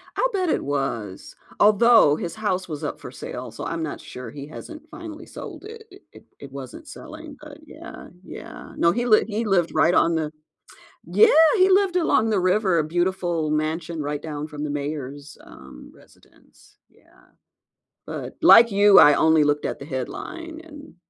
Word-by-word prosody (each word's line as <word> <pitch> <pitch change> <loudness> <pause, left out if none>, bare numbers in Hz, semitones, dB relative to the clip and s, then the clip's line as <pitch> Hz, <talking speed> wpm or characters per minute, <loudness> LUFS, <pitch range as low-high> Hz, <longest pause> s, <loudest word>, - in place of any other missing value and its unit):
I - - +1
bet 370 -4 -1
it - - 0
was, 135 -9 -4 0.2
although 215 -6 +5
his 170 +3 -6
house 190 -4 -2
was 150 -3 -7
up - - -5
for - - -10
sale, - - -8
so - - -8
I'm 165 0 -4
not 155 - -6
sure 125 -2 -9
he 140 0 -9
hasn't 305 - -11
finally 315 0 -10
sold - - -10
it 450 +1 -11 0.3
it - - -16 0.2
it 140 -2 -11
wasn't 140 - -10
selling, 310 0 -11
but 300 0 -12
yeah, 320 +2 -12 0.2
yeah, - - -11
no, 170 - +3
he 240 +4 -2
lived 215 -3 +4
he 220 +2 -2
lived 180 -5 +1
right 160 +2 +3
on 165 0 +3
the 155 -1 -2 0.7
Yeah! 445 - +5 0.3
He 375 +1 +4
lived 380 -1 +2
along 225 -10 +2
the 205 -3 +1
river, 185 -1 +1
a - - +1
beautiful 175 -1 -1
mansion 155 +1 -3
right 145 0 -4
down 150 -1 -6
from 150 -1 -7
the 150 - -3
mayor's, 145 -1 -6
um, 65 -2 -14
residence, - - -24
yeah, - - -27 0.7
but - - -7
like 230 -1 +7
you, 200 0 +6
I 145 -1 +7
only 160 -1 +3
looked 145 0 0
at - - -4
the 140 - -9
headline 320 - -7
and 295 - -14
175 Hz, 175 wpm, -23 LUFS, -, 0.7 s, like